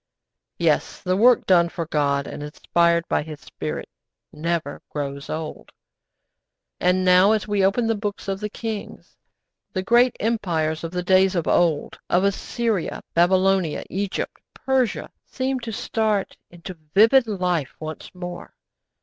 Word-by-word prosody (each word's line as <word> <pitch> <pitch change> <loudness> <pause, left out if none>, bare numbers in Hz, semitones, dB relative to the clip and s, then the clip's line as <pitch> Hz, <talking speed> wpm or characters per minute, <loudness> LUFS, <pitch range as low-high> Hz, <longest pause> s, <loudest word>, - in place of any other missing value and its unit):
Yes, - - +1
the 185 -1 0
work 240 +5 +5
done 170 -2 +4
for 170 -1 -4
God 140 -3 0
and - - -7
inspired 170 +3 +1
by - - +1
His 150 0 -8
Spirit - - -6 0.5
never 165 -2 -3
grows 140 0 -5
old. 155 0 -6 1.1
And 180 +1 +2
now, 185 +3 +6
as 215 -1 -1
we 205 -2 +1
open 205 +5 +2
the 225 - +2
books 205 -2 -4
of 195 0 -2
the 210 0 -3
kings, 220 -1 -7 0.6
the 185 - -2
great 240 +4 +4
empires 170 -9 -1
of 165 - -3
the 180 +1 -3
days 190 +1 +4
of 170 - -1
old, 165 -4 +1
of 180 +2 +3
Assyria, 200 0 -1
Babylonia, 185 -1 +2
Egypt, 195 +1 -3
Persia, 260 -4 0 0.2
seem 260 0 -2
to 235 -2 -6
start 215 -1 -1
into 175 +2 -9 0.2
vivid 230 +4 +6
life 180 -8 -1
once 155 0 -7
more. 180 -1 -8
185 Hz, 140 wpm, -23 LUFS, 170-210 Hz, 1.1 s, now